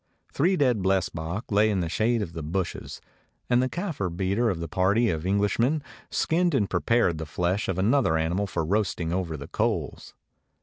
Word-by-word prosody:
Three 180 +6 +2
dead 125 - +2
blesbok 95 +1 -1
lay 105 +2 +4
in 100 -3 0
the 85 - -1
shade 110 +6 +1
of 85 -4 -7
the 80 - -5
bushes, 85 +4 -4 0.5
and 120 0 +5
the 130 - 0
Kafir 165 - -3
beater 95 +7 0
of 90 -5 -2
the 85 - -4
party 95 +7 +2
of 80 +2 -3
English 100 +2 +1
men 140 +5 +2 0.3
skinned 175 -1 +1
and 105 -6 +2
prepared 105 -10 +1
the 80 - -5
flesh 90 +6 -1
of 95 - -1
another 105 - +3
animal 85 +6 0
for 85 -4 -2
roasting 90 -3 0
over 90 -4 -2
the 70 - -8
coals. - - -2
95 Hz, 185 wpm, -26 LUFS, 85-115 Hz, 0.5 s, and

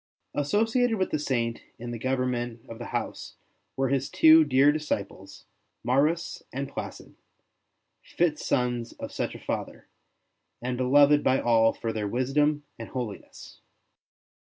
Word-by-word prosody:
Associated 225 - +1
with 185 - -1
the 155 - 0
Saint 120 -5 -1 0.2
in 120 0 -7
the 120 - -5
government 125 -2 -2
of 115 0 -9
the 120 - -6
house - - -5 0.4
were 135 -1 +1
his 135 0 0
two 160 0 +7
dear 140 0 +4
disciples, 100 -10 -5 0.4
Maurus 150 +7 +1
and 135 +2 -3
Placid, - - -8 0.9
fit 165 -3 0
sons 120 -2 -1
of - - -8
such - - -3
a - - -9
Father, - - -5 0.7
and 125 +1 -3
beloved 145 +3 +4
by 130 - +3
all 115 -1 +4
for 115 -1 -4
their 105 -2 -2
wisdom 145 +6 +1 0.2
and - - -7
holiness. 120 -6 -7
130 Hz, 135 wpm, -27 LUFS, 120-150 Hz, 0.9 s, two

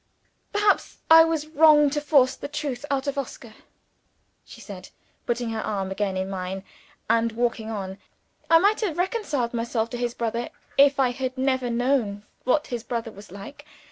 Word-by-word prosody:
"Perhaps 415 0 +1
I 325 0 +10
was 325 -2 -1
wrong 305 -2 +5
to 295 0 -1
force 280 -4 +3
the - - -7
truth 290 -2 -4
out 275 -1 0
of 280 0 -2
Oscar?" 235 -4 -7 0.9
she - - -14
said, 190 -3 -10 0.4
putting 240 -1 -1
her 220 -1 -3
arm 195 -2 -3
again 195 -1 -2
in 190 0 -2
mine, 190 0 -5 0.4
and 230 0 +2
walking 235 -1 -1
on. 195 -3 -5 0.5
"I 330 - +8
might 405 +6 +3
have 360 -7 -2
reconciled 350 - -1
myself 230 -1 -2
to 245 - -4
his 240 0 -2
brother, 235 +1 -2 0.3
if 280 0 +5
I 255 -2 +3
had 260 +1 -4
never 260 -1 0
known 235 -4 0 0.2
what 295 +4 +2
his 240 -2 -5
brother 230 -2 -4
was 200 -3 -14
like. 200 +10 -10
245 Hz, 170 wpm, -25 LUFS, 220-290 Hz, 0.9 s, I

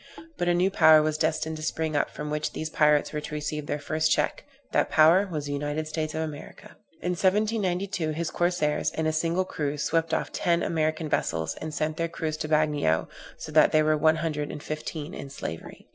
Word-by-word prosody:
But 175 - -2
a 175 - +3
new 185 +2 +2
power 155 -4 +6
was 155 0 0
destined 160 0 0
to - - -8
spring 155 0 -2
up, 145 - +1
from 150 0 -6
which 150 0 -2
these 155 0 -4
pirates 150 -1 +3
were 150 - -2
to 150 - -6
receive 150 0 -4
their - - -1
first 155 +2 0
check; - - 0 0.3
that - - +2
power 165 +6 +5
was 150 -3 -3
the 145 - -4
United 145 +2 -2
States 155 0 -3
of 160 - -1
America. 150 -2 -9 0.3
In 180 - 0
1792 190 -2 0
his 160 +1 -2
corsairs, 175 -4 +1
in 160 +1 -3
a 155 - +1
single 170 +4 0
cruise, 150 -3 -3
swept 165 0 0
off - - -1
ten 170 -1 +1
American 155 0 -1
vessels, 80 - -1
and 155 - -4
sent 155 +1 -2
their 165 - 0
crews 155 -1 -3
to 155 - -4
the 155 - +3
Bagnio, 150 - +1 0.3
so 155 - -8
that 155 0 +5
there 155 0 +4
were 155 0 +3
one 155 +1 +3
hundred 155 -3 -2
and 145 - -8
fifteen 155 +1 -5
in 140 - -7
slavery. 80 - -8
155 Hz, 215 wpm, -26 LUFS, 150-165 Hz, 0.3 s, power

